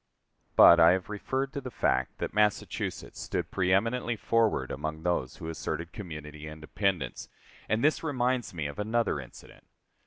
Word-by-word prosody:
But 85 Hz, -, +9 dB
I 85 Hz, +1 st, +8 dB
have 95 Hz, +2 st, -3 dB
referred 130 Hz, +6 st, -2 dB
to 140 Hz, -, -4 dB
the 130 Hz, -, -6 dB
fact -, -, 0 dB
that -, -, -4 dB
Massachusetts 105 Hz, 0 st, -1 dB
stood -, -, -3 dB
preëminently 110 Hz, +6 st, +1 dB
forward 110 Hz, -, +1 dB
among 80 Hz, 0 st, -4 dB
those 85 Hz, -8 st, -1 dB
who 80 Hz, -, -8 dB
asserted 80 Hz, +1 st, -4 dB
community 75 Hz, -5 st, -8 dB
independence: 80 Hz, -, -2 dB, 0.4 s
and 110 Hz, +1 st, +1 dB
this 155 Hz, +1 st, +3 dB
reminds 130 Hz, -5 st, 0 dB
me 80 Hz, -4 st, -4 dB
of 70 Hz, +7 st, -5 dB
another 110 Hz, -6 st, 0 dB
incident. 60 Hz, -3 st, -13 dB
95 Hz, 150 wpm, -29 LUFS, 80-115 Hz, 0.4 s, But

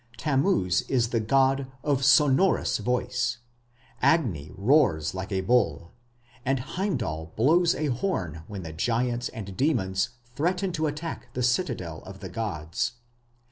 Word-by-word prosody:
Tammuz 135 Hz, -, +2 dB
is 120 Hz, -3 st, +2 dB
the 115 Hz, -, +1 dB
god 135 Hz, +4 st, +2 dB, 0.2 s
"of 140 Hz, -3 st, +1 dB
sonorous 140 Hz, 0 st, +4 dB
voice"; 125 Hz, +1 st, -1 dB, 0.6 s
Agni 100 Hz, -, +2 dB
"roars 100 Hz, -, +3 dB
like 95 Hz, +3 st, -5 dB
a 95 Hz, -1 st, 0 dB
bull"; 85 Hz, -7 st, +1 dB, 0.5 s
and 135 Hz, +1 st, +1 dB
Heimdal 125 Hz, -, -3 dB
blows 170 Hz, +9 st, +4 dB
a 155 Hz, -, -2 dB
horn 120 Hz, -, -2 dB
when 100 Hz, -3 st, -6 dB
the 80 Hz, -1 st, -7 dB
giants 120 Hz, +7 st, 0 dB
and 100 Hz, -5 st, -7 dB
demons 95 Hz, -10 st, +1 dB, 0.3 s
threaten 180 Hz, +6 st, 0 dB
to 160 Hz, -2 st, 0 dB
attack 150 Hz, +3 st, -5 dB
the 125 Hz, -, -1 dB
citadel 120 Hz, -, -1 dB
of 95 Hz, 0 st, -11 dB
the 95 Hz, -, -7 dB
gods. 105 Hz, +3 st, -3 dB
125 Hz, 135 wpm, -26 LUFS, 95-145 Hz, 0.6 s, sonorous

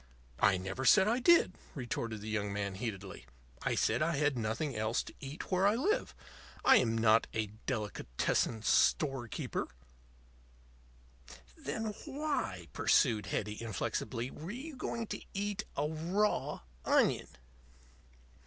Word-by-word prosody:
"I 100 Hz, -2 st, +4 dB
never 95 Hz, +8 st, -4 dB
said 190 Hz, +7 st, +6 dB
I 235 Hz, +3 st, +2 dB
did," 335 Hz, -, +5 dB, 0.2 s
retorted 115 Hz, -4 st, -3 dB
the 105 Hz, -, -7 dB
young 105 Hz, -2 st, -1 dB
man, 100 Hz, -1 st, -2 dB
heatedly. 95 Hz, -, -6 dB, 0.3 s
"I -, -, 0 dB
said -, -, +2 dB
I 165 Hz, +1 st, +2 dB
had 145 Hz, -1 st, +2 dB
nothing 120 Hz, +5 st, -2 dB
else 110 Hz, +2 st, 0 dB
to -, -, -11 dB
eat 140 Hz, +7 st, -7 dB
where 185 Hz, +1 st, +4 dB
I 205 Hz, -, +3 dB
live. 355 Hz, -, 0 dB, 0.5 s
I -, -, +8 dB
am 115 Hz, -2 st, +2 dB
not 110 Hz, 0 st, +4 dB
a 110 Hz, -2 st, -1 dB, 0.2 s
delicatessen 105 Hz, -, -1 dB
store 135 Hz, -2 st, +3 dB
keeper." -, -, -3 dB, 1.9 s
"Then 210 Hz, +10 st, -3 dB
why," 275 Hz, -, -2 dB
pursued 110 Hz, -3 st, +3 dB
Hetty, 105 Hz, +1 st, -3 dB
inflexibly, 115 Hz, +3 st, -3 dB
"were 160 Hz, +4 st, -8 dB
you 270 Hz, +8 st, -6 dB
going 235 Hz, -2 st, -3 dB
to -, -, -5 dB
eat 205 Hz, +1 st, -2 dB
a 145 Hz, -, +1 dB
raw 175 Hz, +7 st, 0 dB, 0.2 s
onion?" -, -, +3 dB
130 Hz, 135 wpm, -33 LUFS, -, 1.9 s, I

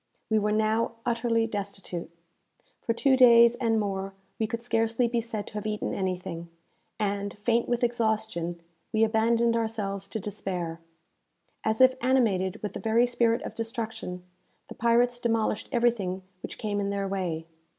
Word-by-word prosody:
We 220 Hz, -, +4 dB
were 210 Hz, 0 st, 0 dB
now 220 Hz, +2 st, +1 dB
utterly 230 Hz, -1 st, +1 dB
destitute. 200 Hz, -5 st, -5 dB, 0.7 s
For -, -, -1 dB
two 265 Hz, +4 st, +3 dB
days 235 Hz, -2 st, +7 dB
and 230 Hz, -3 st, +1 dB
more, 195 Hz, -1 st, -3 dB, 0.2 s
we 220 Hz, -, +1 dB
could 230 Hz, +1 st, -4 dB
scarcely 230 Hz, 0 st, +1 dB
be 235 Hz, 0 st, 0 dB
said 220 Hz, -3 st, -4 dB
to -, -, -12 dB
have 210 Hz, 0 st, -4 dB
eaten 210 Hz, 0 st, -2 dB
anything, 180 Hz, -3 st, -3 dB, 0.5 s
and, 200 Hz, -1 st, -2 dB
faint 230 Hz, +3 st, +1 dB
with 240 Hz, 0 st, 0 dB
exhaustion, 220 Hz, -7 st, -1 dB, 0.3 s
we 220 Hz, 0 st, +3 dB
abandoned 230 Hz, +1 st, +3 dB
ourselves 210 Hz, -4 st, -2 dB
to 220 Hz, -, -4 dB
despair. 185 Hz, -5 st, -4 dB, 0.8 s
As 220 Hz, +2 st, +1 dB
if 260 Hz, 0 st, +7 dB
animated 220 Hz, -9 st, +1 dB
with 210 Hz, -2 st, -3 dB
the -, -, -5 dB
very 225 Hz, +2 st, +3 dB
spirit 235 Hz, -1 st, +1 dB
of -, -, -6 dB
destruction, 225 Hz, -5 st, -4 dB, 0.5 s
the -, -, -7 dB
pirates 240 Hz, +1 st, +2 dB
demolished 225 Hz, -3 st, 0 dB
everything 225 Hz, -7 st, +1 dB, 0.2 s
which -, -, -7 dB
came 205 Hz, -2 st, -2 dB
in 200 Hz, 0 st, -1 dB
their 200 Hz, -1 st, -1 dB
way. 180 Hz, -5 st, -2 dB
220 Hz, 155 wpm, -27 LUFS, 200-235 Hz, 0.8 s, days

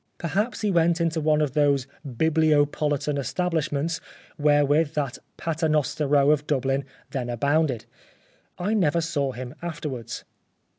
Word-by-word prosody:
Perhaps 200 Hz, +10 st, -1 dB
he 210 Hz, -2 st, +1 dB
went 170 Hz, -1 st, +3 dB
into 165 Hz, -1 st, 0 dB
one 155 Hz, 0 st, +3 dB
of 145 Hz, -4 st, 0 dB
those 140 Hz, -3 st, +3 dB, 0.2 s
bibliopolitan 150 Hz, 0 st, +1 dB
establishments 160 Hz, +1 st, -1 dB, 0.3 s
wherewith 145 Hz, +1 st, +3 dB
that 140 Hz, -4 st, -2 dB, 0.2 s
Paternoster 155 Hz, -2 st, 0 dB
Row 140 Hz, 0 st, +4 dB
of 150 Hz, -1 st, +1 dB
Dublin 135 Hz, -1 st, 0 dB, 0.3 s
then 125 Hz, -3 st, -3 dB
abounded. 140 Hz, 0 st, +1 dB, 0.7 s
I 195 Hz, +5 st, -1 dB
never 170 Hz, -6 st, +2 dB
saw 145 Hz, -4 st, -1 dB
him 125 Hz, 0 st, -7 dB
afterwards. 150 Hz, -8 st, -5 dB
150 Hz, 120 wpm, -25 LUFS, 140-165 Hz, 0.7 s, Row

